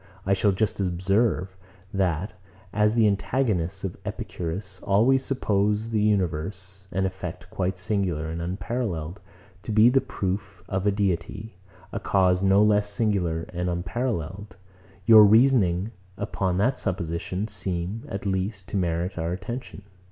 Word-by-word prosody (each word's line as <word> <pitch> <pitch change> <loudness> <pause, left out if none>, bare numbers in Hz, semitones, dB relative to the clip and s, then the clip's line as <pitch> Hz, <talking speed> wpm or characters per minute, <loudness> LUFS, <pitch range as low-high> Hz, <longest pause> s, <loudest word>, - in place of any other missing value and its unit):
I 95 - +3
shall 100 +1 +3
just 100 +2 -1
observe, 95 +1 +1 0.4
that, 90 -1 0 0.4
as 105 +1 +3
the 115 -2 +4
antagonists 100 -3 0
of 95 -3 -4
Epicurus 95 -3 -5
always 115 +7 +3
suppose 105 -4 0
the 110 -2 +1
universe, 95 -1 -1
an 95 0 0
effect 90 -1 -6
quite 95 -3 -1
singular 90 -5 -1
and 80 +1 -4
unparalleled, 90 -2 -3 0.4
to 110 - -5
be 110 +2 +6
the 135 +1 +3
proof 95 -6 -4
of 95 +2 -1
a - - +5
Deity, 100 +2 -2 0.4
a - - -3
cause 95 -2 +2
no 100 +1 +5
less 105 -1 +3
singular 95 -6 0
and 90 +1 -1
unparalleled; 95 - -3 0.5
your 110 -1 +9
reasonings, 105 -4 +4 0.3
upon 95 -3 -1
that 125 +6 +1
supposition, 90 +2 -2
seem, 95 0 -3
at 100 +1 -5
least, 95 0 -2
to - - -2
merit 85 +1 -1
our 80 +1 -1
attention. 110 +4 -6
95 Hz, 135 wpm, -25 LUFS, 90-105 Hz, 0.5 s, your